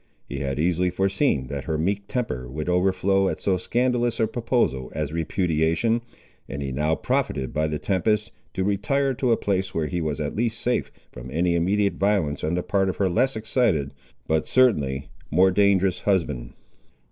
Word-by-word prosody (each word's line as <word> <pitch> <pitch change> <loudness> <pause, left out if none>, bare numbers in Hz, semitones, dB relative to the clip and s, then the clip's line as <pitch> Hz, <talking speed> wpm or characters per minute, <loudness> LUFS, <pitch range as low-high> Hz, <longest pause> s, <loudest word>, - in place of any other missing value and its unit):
He 70 - -5
had 70 0 -2
easily 90 +2 +2
foreseen 95 - +1
that 70 -1 -4
her 80 -2 -1
meek 100 +5 -1
temper 65 - -3
would 75 +4 -5
overflow 95 +2 +2
at - - -4
so 95 -2 +1
scandalous 120 +2 0
a 110 - +4
proposal 110 - -1
as 75 -1 -2
repudiation, 85 +6 +1 0.5
and 70 +1 -4
he 70 - -3
now 75 +4 +1
profited 65 -4 -1
by 80 +1 +1
the 75 0 -2
tempest, 105 +5 0 0.2
to 95 - 0
retire 120 +8 +1
to 125 -1 0
a 115 - +4
place 95 -2 -1
where 80 - 0
he 85 +3 -2
was 75 -3 -2
at 75 -1 -3
least 115 0 -1
safe 125 0 -1 0.2
from 60 +1 -9
any 85 +5 +1
immediate 100 +4 +1
violence 95 -8 +1
on 80 +3 0
the 90 - -1
part 95 -1 +1
of 95 - -2
her 95 -2 +1
less 130 +7 +2
excited, 110 - 0 0.3
but 80 0 +1
certainly 70 - +2 0.2
more 95 +5 +4
dangerous 95 -1 +3
husband. 85 -12 -1
90 Hz, 180 wpm, -24 LUFS, 75-105 Hz, 0.5 s, a